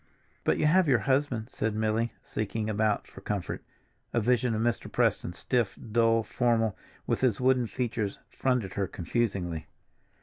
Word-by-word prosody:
"But - - +2
you - - +1
have 175 +3 +5
your 130 -4 +5
husband," 130 -4 +1
said 110 0 -1
Milly, 110 +1 +1
seeking 110 0 -2
about 105 0 +1
for - - -12
comfort. 100 -4 -3 0.5
A 120 - +3
vision 120 0 +2
of 110 - 0
Mr. 120 -1 -1
Preston, 85 - +1
stiff, 120 +3 0
dull, 115 0 +4
formal, 115 -3 +1 0.3
with - - 0
his 125 -5 +2
wooden 130 -1 +3
features, 115 -4 -2
fronted 125 -7 0
her 100 -2 -1
confusingly. 90 -4 -2
115 Hz, 155 wpm, -29 LUFS, 105-125 Hz, 0.5 s, have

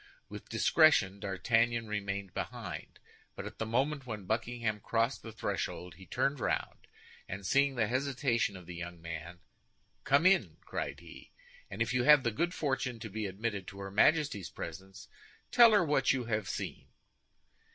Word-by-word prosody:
With - - -9
discretion 105 - +4
D'Artagnan 115 +4 +1
remained 100 -2 -3
behind; - - -6 0.4
but - - -6
at - - -9
the 110 - -2
moment 135 +4 0
when 105 -4 -5
Buckingham 110 0 -1
crossed 115 +3 0
the 115 - -8
threshold, 90 -4 -3
he 95 - -14
turned 135 +2 0
round, - - -2 0.4
and 95 +1 -6
seeing 140 +4 +3
the 115 -3 +2
hesitation 130 -3 0
of 90 - -12
the 90 - -8
young 85 0 -7
man, 85 +1 -7 0.6
"Come 140 +5 +3
in!" 175 - +4
cried - - -4
he, - - -13 0.4
"and 115 - 0
if 115 - -3
you 125 - +2
have 145 +1 +7
the 120 - +1
good 170 +11 0
fortune 135 -4 -1
to 110 -1 -7
be 110 0 -3
admitted 100 0 -3
to 100 - -9
her 95 0 -6
Majesty's 135 - +3
presence, 95 +1 -8 0.4
tell 235 -2 +8
her 205 -5 +4
what 145 -3 +3
you 130 -3 -1
have 110 -3 -2
seen." - - -5
115 Hz, 165 wpm, -32 LUFS, 100-135 Hz, 0.6 s, tell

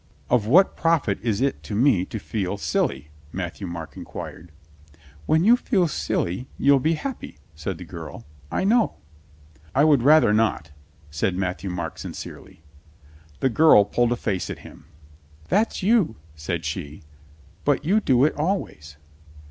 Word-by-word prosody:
"Of 115 -4 +3
what 180 - +5
profit 165 - +1
is 110 -2 -1
it 135 0 0
to 105 - -6
me 110 -6 +3
to 110 - -6
feel 100 -2 -3
silly.?" 75 -6 -1 0.2
Mat 90 -3 -5
thieu 100 - -6
Marc 85 -2 -7
inquired. 85 0 -9 0.8
"When 160 +1 +3
you 230 +5 +7
feel 200 -8 +1
silly 125 - -2
you'll 140 0 +4
be 160 +5 +1
happy," 265 - -6 0.2
said 80 +4 -5
the 90 - -8
girl. 85 -3 -9 0.3
"I - - -1
know." 225 +4 +2 0.8
"I 140 - +5
would 150 -5 +5
rather 145 -4 +5
not," 105 -8 0 0.4
said 90 +5 -1
Matthieu 95 +1 -3
Marc 90 -1 -5
sin - - -6
cerely. - - -10 0.8
The 135 - +3
girl 125 -5 +6
pulled 120 +3 +1
a - - +2
face 100 -6 -3
at - - -8
him. - - -13 0.6
"That's 215 -2 +1
you," 205 - +3 0.2
said 80 +1 -4
she. 75 -1 -5 0.6
"But - - +1
you 200 +6 +3
do 130 - +3
it 155 - +1
always." 145 - -3
110 Hz, 155 wpm, -24 LUFS, -, 0.8 s, you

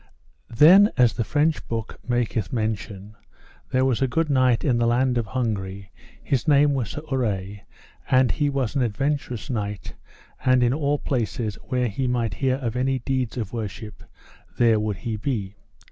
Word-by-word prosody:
Then 175 - +7
as 125 -3 +4
the 115 - -1
French 150 +5 0
book 115 -2 -5
maketh 115 -5 -1
mention, 110 -3 -3 0.6
there 130 0 +2
was 130 -2 0
a 135 - +3
good 160 +3 0
knight 130 -3 +3
in 125 -5 +2
the 120 - +2
land 125 +2 +2
of 115 -3 -1
Hungary, 100 -5 -3 0.3
his 135 +2 -1
name 145 -1 +5
was 125 -6 -2
Sir 150 - -6
Urre, 105 -6 -2 0.5
and 130 -1 +4
he 145 -2 0
was 135 -3 -2
an 140 - +2
adventurous 125 +1 -2
knight, 105 -4 -4 0.5
and 130 -1 +4
in 120 +1 +2
all 145 0 0
places 115 -5 -2
where 125 -1 -1
he 125 +5 -2
might 120 -2 -1
hear 130 -2 0
of 125 -4 -4
any 130 +1 0
deeds 130 -1 -2
of 110 -4 -4
worship 105 -1 -6 0.5
there 115 -2 +4
would 105 -2 -2
he 110 +2 -4
be. 105 -4 -3
120 Hz, 170 wpm, -24 LUFS, 110-135 Hz, 0.6 s, Then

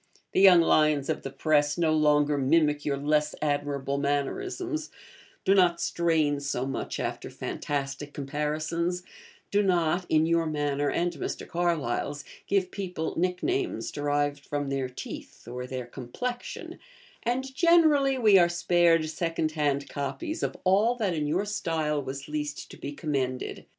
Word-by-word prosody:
The - - +2
young 185 -3 +8
lions 155 -3 +3
of - - -1
the 135 - -5
Press 150 +1 +1
no 165 -2 +2
longer 150 -1 +3
mimic 150 +1 +2
your 140 -1 0
less 150 +1 +1
admirable 145 -2 -1
mannerisms 315 - -2 0.6
do 195 - +5
not 180 -3 +4
strain 160 -4 +1
so 135 -3 -2
much 135 - -4
after - - -3
fantastic 140 0 -4
comparisons, 155 +5 -2 0.5
do 205 - +3
not 175 -2 +1
(in 155 0 +4
your 165 0 +2
manner 145 -1 0
and 175 0 0
Mr. 145 - -5
Carlyle's) 150 -4 -1 0.2
give 190 -2 +1
people 180 -5 -4
nick 180 +1 -1
names 375 0 -1
derived 145 0 0
from 145 -1 -3
their 135 -2 -1
teeth, 125 - -9
or 125 +1 -5
their 130 -1 -5
complexion; 145 - -6 0.4
and, 260 +3 -2
generally, 310 -5 +4
we 210 -6 +6
are 175 -1 +5
spared 175 -2 +3
second 160 0 -1
hand 145 -2 0
copies 310 - -4
of - - -2
all 205 +6 +3
that 210 -7 0
in 150 -2 -1
your 175 +7 0
style 160 -7 -1
was 135 0 -6
least 150 -1 -4
to - - -11
be 140 - -6
commended. 135 -4 -3
155 Hz, 150 wpm, -27 LUFS, 145-180 Hz, 0.6 s, young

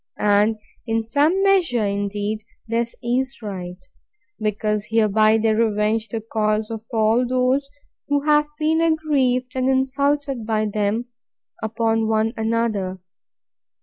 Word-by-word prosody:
And, 210 +1 +3 0.3
in 225 0 0
some 300 - +2
measure, 350 - +3
indeed, 205 +1 -2 0.2
this 230 +1 -1
is 255 +3 -1
right; 180 -3 -6 0.6
because 210 0 -1
hereby 215 0 +3
they 220 0 +2
revenge 215 0 +1
the 225 +1 -3
cause 215 0 -1
of 225 -1 -5
all 225 +1 +3
those 255 +2 +1 0.4
who 285 0 +1
have 300 0 +3
been 315 +1 +1
aggrieved 280 -6 +1
and 260 0 +1
insulted 275 0 0
by 215 -1 0
them, 210 +2 -1 0.6
upon 225 0 0
one 220 +1 +1
another. 220 -4 -1
225 Hz, 120 wpm, -22 LUFS, 215-260 Hz, 0.6 s, And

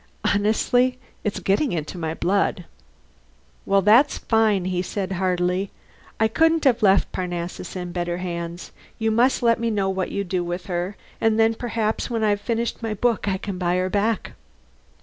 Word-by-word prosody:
Honestly, 245 +5 +2 0.3
it's 210 -2 -2
getting 200 - +1
into 155 +1 -4
my 160 -2 -3
blood." 190 0 0 1.0
"Well, 195 0 +3
that's 235 +9 +5
fine," 220 -5 +2
he 180 -1 0
said 190 +1 -4
heartily. 185 +1 0 0.5
"I 220 - +4
couldn't 325 +7 +2
have 260 -5 +3
left 195 -2 +4
Parnassus 175 0 -4
in 180 -1 -5
better 175 0 -2
hands. 170 -1 -5 0.3
You 220 -1 0
must 245 +3 +2
let 230 -1 +4
me 230 0 0
know 200 -3 0
what 190 -1 -2
you 200 - -1
do 180 -1 -1
with 175 +1 -4
her, 180 +2 -3 0.2
and 225 0 +2
then 225 0 +4
perhaps, 225 -1 -2
when 230 -2 -1
I've 205 -1 +2
finished 230 +2 -2
my 225 -2 -2
book, 230 0 0
I 190 -1 +1
can 190 -1 -5
buy 175 -1 +1
her 185 0 0
back." 210 +1 0
200 Hz, 170 wpm, -23 LUFS, 180-225 Hz, 1.0 s, that's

